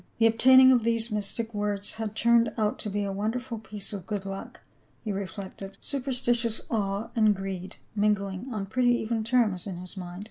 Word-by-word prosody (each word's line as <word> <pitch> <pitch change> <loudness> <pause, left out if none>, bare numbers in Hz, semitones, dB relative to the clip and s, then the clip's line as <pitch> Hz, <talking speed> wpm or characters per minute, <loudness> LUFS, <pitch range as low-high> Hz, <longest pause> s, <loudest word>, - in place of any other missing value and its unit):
The 230 - +3
obtaining 260 +3 +7
of 245 -3 +4
these 230 0 +2
mystic 215 +2 -1
words 205 -1 -2
had 220 -1 -4
turned 235 0 +4
out 210 -2 0
to 210 - -3
be 205 +1 -1
a 200 - -2
wonderful 225 +4 -3
piece 210 -2 -6
of 195 -3 -7
good 205 -3 -3
luck, 195 0 -7 0.4
he 215 - -3
reflected, 195 0 -6
superstitious 245 -4 +1
awe 200 -1 -1
and 215 -3 +4
greed 190 -1 -6 0.2
mingling 205 +2 0
on 210 -4 -3
pretty 245 +3 +2
even 225 -1 -2
terms 215 -6 +1
in 185 -3 -5
his 180 +2 -8
mind. 180 -1 -7
210 Hz, 180 wpm, -27 LUFS, 195-235 Hz, 0.4 s, obtaining